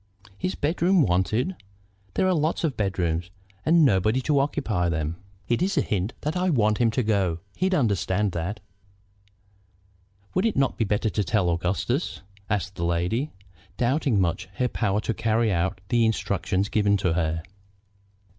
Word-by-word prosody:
"His 185 - -3
bedroom 175 +3 +2
wanted! 105 - +1 0.6
There - - +2
are 185 - +3
lots 155 +1 0
of 150 -6 0
bedrooms, 90 -4 -1 0.3
and 165 0 +5
nobody 110 +1 +3
to 140 +2 +2
occupy 115 -11 0
them." 80 0 -2 0.3
"It's 180 +11 +1
a - - +5
hint 105 0 -2
that 150 +3 -2
I 185 +1 +1
want 110 -8 +2
him 120 -2 +4
to 125 +3 0
go; 95 -6 +1 0.2
he'd 185 0 +1
understand 105 - +1
that." 90 +5 -4 1.7
"Would 185 +5 +2
it 220 - -1
not 135 -1 +2
be 115 - 0
better 105 +1 0
to 105 - 0
tell 95 -4 +1
Augustus?" 95 - -1 0.3
asked 100 -2 -2
the 85 - -3
lady, 90 - 0 0.5
doubting 130 -2 +1
much 90 -1 0
her 125 - +1
power 105 -3 0
to 115 - -1
carry 115 0 +1
out 90 +2 -1
the 120 -1 +3
instructions 100 -3 0
given 100 -1 +2
to 90 -4 0
her. 80 -1 -1
105 Hz, 155 wpm, -25 LUFS, 95-140 Hz, 1.7 s, and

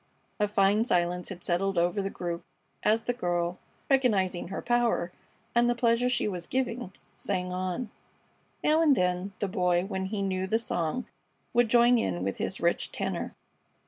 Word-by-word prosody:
A 210 - +3
fine 205 +1 +3
silence 180 -5 0
had 180 -2 -8
settled 190 +2 0
over 175 +4 +2
the 195 - -2
group 170 -3 -4 0.4
as 220 +2 +2
the 245 - 0
girl, 175 -5 -1 0.3
recognizing 205 -11 +2
her 195 - -4
power, 240 -7 +1 0.4
and 240 0 +4
the 240 - +2
pleasure 235 +1 +2
she 250 - +1
was 180 -4 -4
giving, 245 -5 -2 0.2
sang 180 -2 -2
on. 185 +5 -3 0.7
Now 310 +2 +4
and 300 -4 +5
then 180 0 0
the 200 - -1
Boy, 180 -1 +1
when 190 -1 -3
he 200 +1 -2
knew 190 -1 -1
the 220 - +2
song, 225 0 -2 0.5
would 240 -2 +4
join 240 +1 +5
in 90 - -1
with 95 0 -2
his - - -2
rich - - 0
tenor. - - -3
195 Hz, 170 wpm, -28 LUFS, 180-235 Hz, 0.7 s, and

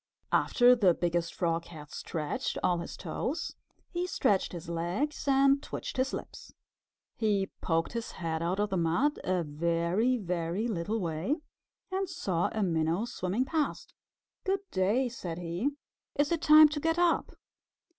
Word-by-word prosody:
After 245 0 +5
the 190 -8 +4
Biggest 170 -1 0
Frog 165 -2 -1
had 150 -3 -11
stretched 155 -3 -3
all 175 -1 +2
his 170 - -6
toes, 320 +7 -3 0.4
he 355 0 -1
stretched 205 - +1
his 175 -1 -7
legs 175 - -2
and 275 0 +4
twitched - - -6
his 260 +1 +1
lips. - - -8 0.6
He 205 -4 0
poked 165 +2 0
his 230 -1 -4
head 165 -2 -3
out 175 +4 -1
of 210 0 0
the 190 - +1
mud 170 - +1
a 185 -2 +1
very, 170 +10 +1
very 180 +1 -2
little 210 +1 -1
way, 170 - -1 0.6
and 380 0 -1
saw 175 -3 -1
a 220 - -1
Minnow 165 +3 +1
swimming 235 0 -1
past. 305 +1 -2 0.5
"Good 385 0 0
day!" 215 +7 +2
said 180 -9 -5
he. 175 +9 -1 0.5
"Is 290 +1 +1
it 335 -2 +1
time 305 0 +9
to 295 0 -3
get 325 +2 +1
up?" 350 -1 +2
195 Hz, 155 wpm, -30 LUFS, 170-270 Hz, 0.6 s, time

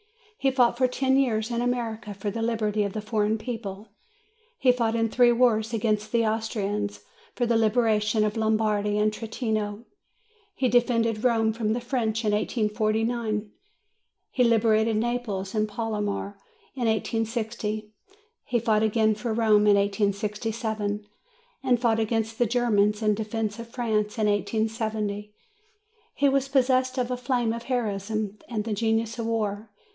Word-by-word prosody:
He 270 - +3
fought 250 -3 +3
for 255 - +4
ten 265 +1 +1
years 225 -4 +1
in 235 0 -1
America 230 -4 -2
for 200 +1 -3
the 225 +2 -4
liberty 220 -2 0
of 200 0 -2
a 215 - -2
foreign 215 0 0
people; 215 -3 -6 0.7
he 255 - +4
fought 230 -2 0
in 225 0 +2
three 245 +1 +5
wars 230 -2 +2
against 215 -1 0
the 230 -1 +2
Austrians, 210 -2 -2 0.3
for 245 - +1
the 235 0 +1
liberation 220 -1 +2
of 215 +1 0
Lombardy 215 -2 +1
and 215 0 +2
Trentino; 220 -1 -3 0.7
he 260 - +1
defended 230 -2 +2
Rome 225 -3 +2
from 220 -1 -1
the 240 - -1
French 235 -3 -1
in 210 - +2
1849; 215 0 0 0.8
he 250 - +2
liberated 225 -1 +3
Naples 215 -4 -2
and 215 -1 0
Palermo 210 -2 -3 0.4
in 245 -3 -1
1860; 220 -1 -2 0.5
he 240 - 0
fought 220 -2 +2
again 220 0 +3
for 225 +2 -4
Rome 215 -2 +4
in 205 - +6
1867; 210 +1 -1 0.6
and 255 -3 +2
fought 225 -2 +2
against 225 0 -1
the 240 - +3
Germans 210 -3 +2
in 215 -1 +3
defence 220 0 -3
of 230 - -7
France 220 -3 -1
in 215 - +1
1870. 210 0 -1 0.8
He 285 - +3
was 275 0 +1
possessed 260 -1 +2
of 250 -1 0
the 250 - -2
flame 245 -2 0
of 235 - -5
heroism 215 -4 -2
and 220 -3 -2
the 220 0 -3
genius 225 +2 0
of 225 - -2
war. 215 -1 -2
220 Hz, 150 wpm, -26 LUFS, 210-235 Hz, 0.8 s, in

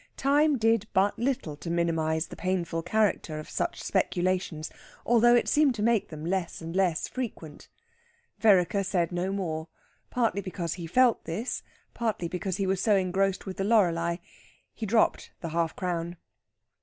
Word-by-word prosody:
Time 290 +1 +3
did 225 -2 +2
but 200 +1 +2
little 240 - -1
to 160 +3 -7
minimise 165 -1 0
the - - -10
painful 175 -3 -1
character 180 -4 0
of 155 - -7
such - - -3
speculations, 180 -3 -1 0.3
although 240 +1 +5
it 240 - +2
seemed 295 -4 +3
to 210 - -2
make 230 -2 +2
them 155 -1 -7
less 185 0 -2
and 165 +1 -7
less 185 -4 +1
frequent. 205 - -6 0.7
Vereker 200 -2 +4
said 180 -3 0
no 180 +2 -1
more, 165 -5 -3 0.4
partly 230 -5 0
because 180 -3 -4
he 170 -2 -6
felt 245 +6 +3
this, 200 +10 -3 0.3
partly 220 -7 -2
because 185 +1 -3
he 195 - 0
was 190 0 0
so 210 -1 +4
engrossed 195 +1 0
with 190 -2 -6
the 195 - -1
Loreley. 170 -5 +2 0.5
He 220 - -5
dropped 220 +3 +1
the 165 - -5
half 165 0 -1
crown. 175 -1 -3
185 Hz, 160 wpm, -28 LUFS, 170-220 Hz, 0.7 s, although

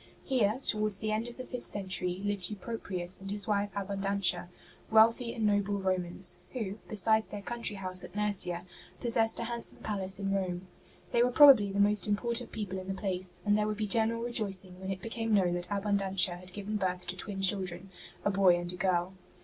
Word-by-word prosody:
Here, 240 -3 +1
towards 215 -2 0
the 215 0 -3
end 220 +2 -2
of 240 - -10
the 255 - -6
fifth 250 -1 -6
century, 185 -2 -1
hved 205 -3 -1
Euproprius 195 -4 -1
and 195 - -8
his 205 0 -3
wife 205 -1 0
Abundantia, 195 -2 -1 0.4
wealthy 230 +2 +4
and 225 -2 -2
noble 205 -1 +1
Romans, 185 -1 +2
who, 220 -5 -4
besides 220 +1 +2
their 205 -1 -7
country 235 -1 -2
house 185 -2 0
at - - -11
Nursia, 185 -4 +1 0.3
possessed 225 -1 +1
a - - -2
handsome 235 0 -4
palace 195 -2 0
in 195 -1 -2
Rome. 185 -1 -3 0.4
They 235 - +2
were 245 - +3
probably 250 -7 +7
the 200 - -2
most 205 0 +5
im 205 - +2
portant 235 +2 -1
people 195 -4 -5
in 185 - -9
the 195 0 -4
place, 185 -3 -2
and 205 0 +3
there 210 0 +1
would 215 -1 -3
be 215 - -1
general 225 +2 +1
rejoicing 195 -6 -1
when 190 - -6
it 190 -1 -5
became 225 -1 -1
known 180 -3 +2
that 175 0 -5
Abundantia 195 -3 +1
had 180 +1 -11
given 205 +2 -4
birth 180 -2 -2
to 180 +1 -2
twin 195 +1 -5
children, 190 -1 +1 0.3
a 205 - +2
boy 190 -3 +4
and 175 +1 -5
a - - -8
girl. 180 -1 0
200 Hz, 200 wpm, -30 LUFS, 185-215 Hz, 0.4 s, probably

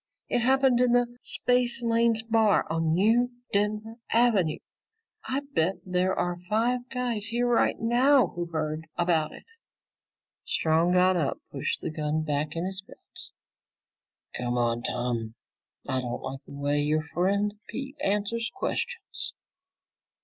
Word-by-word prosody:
It - - +2
happened 260 0 +3
in 250 -1 +3
the 245 0 +2
Spacelanes 235 -2 +2
Bar 225 -2 +3
on 165 0 +1
New 225 +6 +3 0.2
Denver 210 +2 0
Avenue. 220 -9 +3 0.7
I 270 +2 -1
bet 170 +4 +2
there 185 0 0
are 175 0 -1
five 245 +3 0
guys 240 -4 -1
here 240 +1 0
right 240 -1 +2
now 245 -1 +4
who 175 0 -3
heard 155 -1 -3
about 165 -3 +1
it!" - - -12 1.0
Strong 165 +2 +2
got 185 +1 +4
up, 155 -5 0
pushing - - -2
the - - -15
gun 155 0 -1
back 150 0 -2
in 165 +2 -2
his 190 +1 -4
belt. 195 - -12 1.1
"Come 125 0 -2
on, 120 -1 +1
Tom. 120 -2 -2 0.5
I 130 0 0
don't 120 -1 -5
like 135 +1 -6
the - - -11
way 145 +1 0
your 155 +1 +1
friend 200 +5 0 0.2
Pete 270 +2 -6
answers 210 +3 0
questions." 475 +4 -3
195 Hz, 135 wpm, -27 LUFS, 155-240 Hz, 1.1 s, now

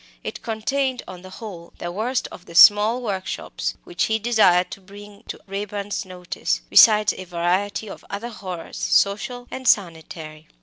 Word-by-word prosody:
It - - -6
contained 255 +4 -2
on 180 -1 -9
the 185 - -11
whole 185 -4 -10
the 175 - -5
worst 235 +7 -2
of 180 - -12
the 170 - -12
small 215 +6 +7
workshops 190 -4 -4
which 355 -1 -1
he 220 - +1
desired 210 -6 +3
to 195 - -8
bring 205 +1 -13
to - - -7
Raeburn's 200 0 -4
notice, 180 - -3
besides 215 -1 +7
a - - -8
variety 185 +5 -1
of - - -10
other 205 +4 -5
horrors, 185 -7 -8
social 245 +5 +1
and 260 -1 -5
sanitary. 160 -5 -1
200 Hz, 160 wpm, -22 LUFS, 180-220 Hz, -, small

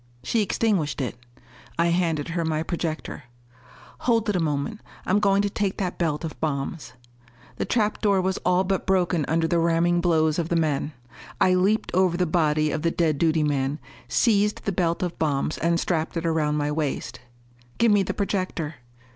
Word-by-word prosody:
She 225 - +1
extinguished 195 -8 0
it. 130 -3 -2 0.6
I 170 +1 +3
handed 170 -3 0
her 170 0 -1
my 160 -1 -1
projector. 165 -5 -4 0.7
"Hold 230 -2 +1
it 205 - +1
a - - +2
moment. 160 +7 -2 0.2
I'm 200 +3 +2
going 200 -1 +3
to 205 - 0
take 200 -2 -1
that 185 -3 -3
belt 160 -3 0
of 160 - -7
bombs." 140 -2 -3 0.6
The - - -1
trap 215 -3 0
door 200 -3 +3
was 185 0 -1
all 180 +1 +2
but 190 0 -2
broken 180 -5 +2
under 165 +1 +1
the 170 +1 +1
ramming 170 +1 +2
blows 160 -2 +2
of 165 -1 -2
the 170 - +1
men. 155 -2 0 0.5
I 185 - +4
leaped 195 +4 +1
over 185 -1 +2
the 180 - +2
body 155 -2 +1
of 155 - -2
the 165 - +2
dead 160 -4 0
duty 160 -2 +2
man, 140 -1 0 0.3
seized 210 -3 +2
the 200 - +1
belt 170 -2 0
of 175 -1 -4
bombs 150 -1 0
and 170 +1 +1
strapped 165 -1 -1
it 165 - -3
around 155 -2 +1
my 145 0 0
waist. 150 -2 -3 0.6
"Give 230 -1 +4
me 205 -1 +4
the 190 - -2
projector." 185 -6 -2
170 Hz, 185 wpm, -24 LUFS, 155-190 Hz, 0.7 s, I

